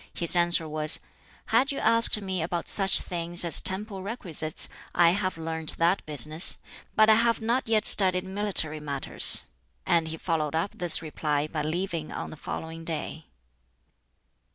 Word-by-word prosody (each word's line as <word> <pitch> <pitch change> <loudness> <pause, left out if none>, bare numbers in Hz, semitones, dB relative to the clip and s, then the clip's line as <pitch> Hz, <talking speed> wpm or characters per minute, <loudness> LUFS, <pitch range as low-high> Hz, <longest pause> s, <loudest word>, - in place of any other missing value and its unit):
His 170 0 +4
answer 170 -2 +2
was, 155 0 +3 0.5
"Had 255 +6 +1
you 275 - -6
asked 230 -1 +5
me 190 -3 -4
about 170 +1 -4
such 195 -1 +4
things 175 -1 -3
as 165 - +2
temple 195 +1 -3
requisites, 180 -7 -3 0.3
I 170 -1 +4
have 185 -1 -3
learnt 160 -1 -5
that 170 +3 0
business, 155 +2 +3 0.4
but 215 0 +4
I 220 - +6
have 230 +1 +1
not 235 +3 -2
yet 220 -1 0
studied 185 -2 +6
military 190 -5 0
matters." 140 -2 -1 0.4
And 165 -2 0
he 160 0 -7
followed 160 -3 -3
up 165 +5 -2
this 175 -2 +1
reply 150 -1 -3
by 155 -1 -5
leaving 165 0 -5
on - - -7
the - - -9
following 160 +2 -8
day. 160 -1 -6
170 Hz, 155 wpm, -25 LUFS, 160-195 Hz, 0.5 s, I